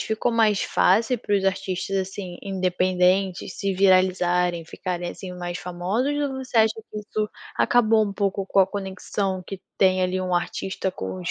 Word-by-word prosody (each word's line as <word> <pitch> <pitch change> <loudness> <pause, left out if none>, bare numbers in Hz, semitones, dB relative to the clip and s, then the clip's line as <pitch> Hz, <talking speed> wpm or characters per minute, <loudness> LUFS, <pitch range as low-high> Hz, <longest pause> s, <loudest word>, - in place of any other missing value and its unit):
ficou 220 +2 -1
mais 220 -3 +3
fácil 225 +6 +2
para 205 -2 -1
os 195 - -1
artistas, 190 0 -1
assim, 190 -1 -4
independentes 185 0 +1
se 195 -1 -1
viralizarem, 180 -2 +3
ficarem, 175 +1 -4
assim, 185 -2 -8
mais 175 0 -4
famosos? 185 +10 -1
Ou 285 -2 -1
você 250 - -5
acha 220 0 +4
que 210 - -6
isso 210 0 -3 0.3
acabou 225 -2 +4
um 200 - -4
pouco 195 -1 -1
com 195 - +3
a 190 - +5
conexão 190 -1 -3
que 195 -2 -7 0.2
tem 185 -1 +3
ali 185 +1 0
um 185 -1 -1
artista 190 +2 -2
com 95 - -6
os 90 - -3
190 Hz, 170 wpm, -24 LUFS, 180-205 Hz, 0.3 s, a